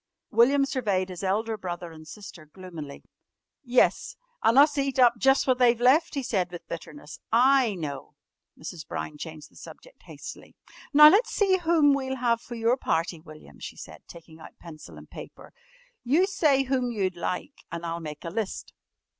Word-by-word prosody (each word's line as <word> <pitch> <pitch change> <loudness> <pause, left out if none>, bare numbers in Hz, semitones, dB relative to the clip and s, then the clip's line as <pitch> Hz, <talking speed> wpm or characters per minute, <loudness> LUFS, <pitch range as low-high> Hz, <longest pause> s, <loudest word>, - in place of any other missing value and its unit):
William 275 +4 +4
surveyed 205 -9 -1
his 180 +1 -8
elder 220 +4 -1
brother 175 -2 -6
and 155 -1 -13
sister 175 -5 -11
gloomily. 160 -4 -10 0.6
"Yes, 250 -1 +1 0.3
an' 230 - +3
us 290 +1 +6
eat 275 -1 -2
up 245 -2 +6
jus' 270 +2 +3
what 255 -1 +1
they've 240 -2 +4
left," 285 +7 +3
he 275 - -2
said 190 -7 -1
with 175 -1 -10
bitterness. 170 - -9
"I 250 -1 +4
know!" 150 -4 -7 0.4
Mrs. 160 +1 -9
Brown 150 -1 -6
changed 155 -2 -9
the - - -25
subject - - -14
hastily. - - -11 0.4
"Now 300 0 +9
let's 410 +8 +3
see 385 -2 +2
whom 325 -5 +3
we'll 265 -1 -2
have 235 -2 0
for 240 - -9
your 230 +2 +1
party, 165 -7 -2
William," 155 - -15
she - - -8
said, - - -11
taking 165 -1 -14
out - - -14
pencil 160 -3 -12
and - - -13
paper. - - -12 0.5
"You 300 +10 +3
say 300 -8 +2
whom 255 -2 -1
you'd 190 -5 -2
like 180 - -5
and 170 0 -6
I'll 170 0 -4
make 150 -2 -8
a 165 - -5
list." 220 -1 -5
225 Hz, 175 wpm, -26 LUFS, 170-270 Hz, 0.6 s, Now